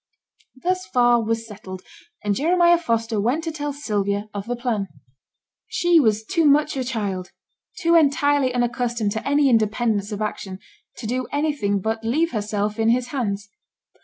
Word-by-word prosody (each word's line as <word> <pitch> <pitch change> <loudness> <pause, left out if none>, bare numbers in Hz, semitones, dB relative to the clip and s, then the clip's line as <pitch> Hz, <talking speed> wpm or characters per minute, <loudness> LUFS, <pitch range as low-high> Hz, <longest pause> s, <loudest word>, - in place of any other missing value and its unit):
Thus 370 +1 0
far 240 -1 +3
was 225 +1 -1
settled; 190 -4 -9 0.4
and 205 -1 +1
Jeremiah 345 - +4
Foster 230 -7 -1
went 255 +10 0
to 325 - -3
tell 295 -1 -3
Sylvia 205 -7 -2
of 200 0 -5
the 245 - -1
plan. 235 -5 -2 0.8
She 345 -1 +3
was 220 -5 +2
too 330 +8 +1
much 295 0 +4
a 265 - -1
child, 205 -7 -3 0.5
too 335 -2 +2
entirely 285 -3 +3
unaccustomed 240 -3 -1
to 220 +4 -4
any 285 0 +3
independence 220 -2 +1
of 205 - -4
action, 205 -3 -4 0.4
to 240 - -7
do 250 +3 -2
anything 285 -10 0
but 220 +2 -2
leave 310 +9 +1
herself 210 0 -2
in 225 0 +3
his 245 +1 +1
hands. 205 -7 -2
235 Hz, 160 wpm, -22 LUFS, 210-285 Hz, 0.8 s, Jeremiah